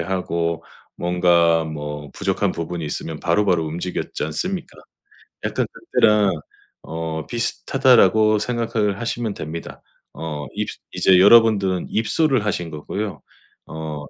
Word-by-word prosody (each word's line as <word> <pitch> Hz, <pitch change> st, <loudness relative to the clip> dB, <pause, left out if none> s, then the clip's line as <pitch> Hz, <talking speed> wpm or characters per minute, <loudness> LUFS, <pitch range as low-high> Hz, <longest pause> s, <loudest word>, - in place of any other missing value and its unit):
하고 85 Hz, -2 st, -2 dB, 0.3 s
뭔가 85 Hz, -2 st, +3 dB
뭐 75 Hz, -2 st, -6 dB
부족한 -, -, -1 dB
부분이 85 Hz, 0 st, -4 dB
있으면 75 Hz, +1 st, -4 dB
바로바로 90 Hz, -1 st, +2 dB
움직였지 85 Hz, +3 st, -4 dB
않습니까? 175 Hz, -, -4 dB, 0.7 s
약간 -, -, 0 dB
'그때랑 105 Hz, -, +2 dB, 0.5 s
어 80 Hz, -1 st, -4 dB
비슷하다.'라고 110 Hz, -3 st, +3 dB
생각을 110 Hz, -3 st, -1 dB
하시면 115 Hz, -2 st, -2 dB
됩니다. 80 Hz, -2 st, -7 dB, 0.3 s
어 75 Hz, -2 st, -5 dB
입스 -, -, -3 dB
이제 95 Hz, -1 st, +4 dB
여러분들은 100 Hz, -3 st, +5 dB
입소를 130 Hz, +1 st, +1 dB
하신 90 Hz, -5 st, -2 dB
거고요. 100 Hz, +7 st, -5 dB, 0.4 s
어. 80 Hz, -2 st, -6 dB
90 Hz, 280 characters per minute, -21 LUFS, 80-110 Hz, 0.7 s, 여러분들은